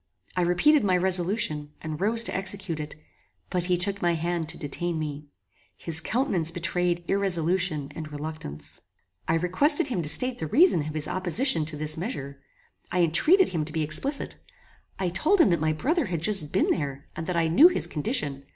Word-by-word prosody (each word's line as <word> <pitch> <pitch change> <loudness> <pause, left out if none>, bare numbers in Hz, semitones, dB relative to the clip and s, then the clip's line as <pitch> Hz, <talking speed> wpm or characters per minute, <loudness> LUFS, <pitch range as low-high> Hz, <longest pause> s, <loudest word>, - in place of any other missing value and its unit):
I 180 - +1
repeated 220 - +3
my 185 -3 +2
resolution, 175 -5 -1
and 155 0 -6
rose 225 +3 +2
to - - -4
execute 190 -3 -2
it; 150 -1 -6 0.6
but 180 -2 +1
he 180 -1 +1
took 200 +3 +1
my 175 -1 +1
hand 165 -1 -3
to 165 - +3
detain 170 +3 -4
me. 150 -1 -5 0.5
His 160 -1 -1
countenance 200 - 0
betrayed 175 0 -2
irresolution 175 -5 0
and 155 -1 -7
reluctance. 80 - -7 0.5
I - - +2
requested 270 - +2
him 195 -9 -1
to 150 - 0
state 255 +8 +5
the 160 - -3
reason 230 - +3
of 155 - -6
his 155 -1 0
opposition 185 - +1
to 155 -2 -5
this 155 +1 -1
measure. 140 - -6 0.5
I 180 0 +1
entreated 320 - +3
him 160 -4 -2
to 155 - -7
be 160 0 -1
explicit. 270 - 0 0.6
I 185 -2 -1
told 305 - +1
him 210 - +5
that 170 -3 +1
my 155 0 +1
brother 290 - -1
had 170 -3 -4
just 195 -8 +1
been 190 - +2
there, 140 -4 -3
and 165 - -6
that 180 -2 -1
I 165 -1 +2
knew 225 - +7
his 360 - 0
condition. 140 -2 -3
175 Hz, 190 wpm, -26 LUFS, 155-195 Hz, 0.6 s, knew